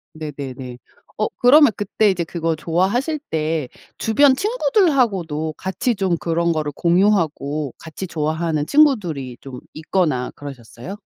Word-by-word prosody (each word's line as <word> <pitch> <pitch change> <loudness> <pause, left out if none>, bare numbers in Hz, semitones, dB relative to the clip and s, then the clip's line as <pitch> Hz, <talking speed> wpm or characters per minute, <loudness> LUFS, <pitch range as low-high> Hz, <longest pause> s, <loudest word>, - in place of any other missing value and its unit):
네네네. 135 -5 -7 0.4
어 215 - +1
그러면 285 +2 +7
그때 205 +1 +1
이제 180 -2 -2
그거 165 -1 -2
좋아하실 195 - 0
때 155 -2 -1 0.3
주변 260 +5 +4
친구들하고도 260 - +1
같이 230 +6 -1
좀 190 -4 0
그런 170 +1 0
거를 155 -2 -2
공유하고 165 - +1
같이 160 +4 -7
좋아하는 160 -1 -1
친구들이 175 - +2
좀 130 -2 -9
있거나 155 -5 -1
그러셨어요? 135 - -9
170 Hz, 305 characters per minute, -20 LUFS, 150-215 Hz, 0.4 s, 그러면